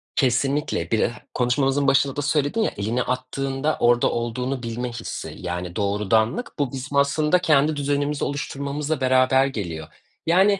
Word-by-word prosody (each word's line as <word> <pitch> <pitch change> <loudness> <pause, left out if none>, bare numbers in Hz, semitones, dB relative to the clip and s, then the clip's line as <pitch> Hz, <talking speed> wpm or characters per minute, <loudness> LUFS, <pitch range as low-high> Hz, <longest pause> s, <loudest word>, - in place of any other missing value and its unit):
Kesinlikle. 135 +4 0
Bir 110 - +2
eh - - +2 0.2
konuşmamızın 135 +3 +1
başında 135 0 +3
da 145 - -1
söyledin 150 +8 +1
ya, - - +1
elini 110 +5 -1
attığında 135 +3 -2
orada 120 0 +4
olduğunu 125 +2 -2
bilme 120 +2 -3
hissi, 120 - -6
yani 90 0 -5
doğrudanlık. 105 - +1
Bu 140 -4 0
bizim 135 +2 -4
aslında 150 +5 +3
kendi 155 -3 +3
düzenimizi 145 0 -1
oluşturmamızla 140 +1 -3
beraber 130 +1 +4
geliyor. 85 - -4 0.4
Yani 190 +4 +4
135 Hz, 140 wpm, -23 LUFS, 120-145 Hz, 0.4 s, orada